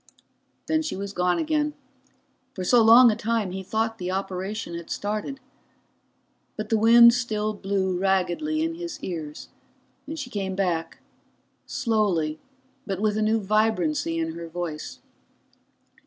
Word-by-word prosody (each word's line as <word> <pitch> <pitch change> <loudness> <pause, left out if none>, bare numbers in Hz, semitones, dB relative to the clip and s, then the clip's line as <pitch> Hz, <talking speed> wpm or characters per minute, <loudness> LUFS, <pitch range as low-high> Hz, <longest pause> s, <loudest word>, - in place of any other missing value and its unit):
Then 315 0 +1
she 310 - -4
was 200 +1 -5
gone 180 -1 +1
again, 300 -1 0 0.8
for 185 - -4
so 240 +6 +5
long 230 +2 +8
a - - -1
time 225 -3 -1
he 190 +1 -5
thought 220 +3 -2
the 180 - -3
operation 190 +1 -4
had 170 -1 -7
started. 215 +6 -3 1.2
But 215 0 -5
the 225 - +3
wind 235 +1 +8
still 215 -3 -1
blew 195 -2 -1
raggedly 195 - 0
in 330 0 -1
his 340 0 -6
ears, 155 -5 -6 0.6
and 315 +2 -5
she 265 -5 -6
came 190 -2 -3
back, 170 -4 -1 0.7
slowly, 185 -9 0 0.5
but 195 -2 -2
with 210 0 +1
new 215 +1 +2
vibrancy 215 - +1
in 165 0 -1
her 170 +1 -7
voice. 165 -2 -5
210 Hz, 140 wpm, -25 LUFS, 185-230 Hz, 1.2 s, long